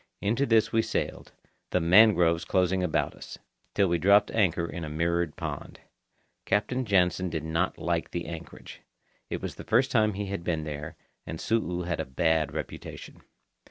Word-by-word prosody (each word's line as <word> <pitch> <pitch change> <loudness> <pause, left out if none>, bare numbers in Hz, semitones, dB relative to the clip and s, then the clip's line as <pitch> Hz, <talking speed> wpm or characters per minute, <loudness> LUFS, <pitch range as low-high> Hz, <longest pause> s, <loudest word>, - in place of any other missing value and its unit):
Into 115 +7 0
this 110 -1 +3
we 115 - +3
sailed, - - -3 0.4
the - - +1
mangroves 90 -2 +5
closing 95 0 +1
about 90 -3 0
us, - - -10 0.4
till 100 -1 +3
we 85 -1 +1
dropped 100 +5 +4
anchor 90 -6 +1
in 85 0 -6
a 80 - -5
mirrored 85 +1 -1
pond. - - -6 0.6
Captain 125 +5 0
Jansen 90 -2 +2
did 80 -2 -3
not 80 +3 -1
like 85 -1 -1
the 85 -1 -4
anchorage. 85 -1 -9 0.5
It - - -4
was - - -4
the - - -10
first 125 +4 +2
time 110 -3 +3
he 105 +1 -3
had 100 -3 -4
been 80 -3 -1
there, 75 -1 -6 0.3
and 80 - -5
Su'u 90 -4 -1
had 85 -2 -2
a 80 - -2
bad 80 +2 +1
reputation. 80 - -7
90 Hz, 170 wpm, -27 LUFS, 80-105 Hz, 0.6 s, mangroves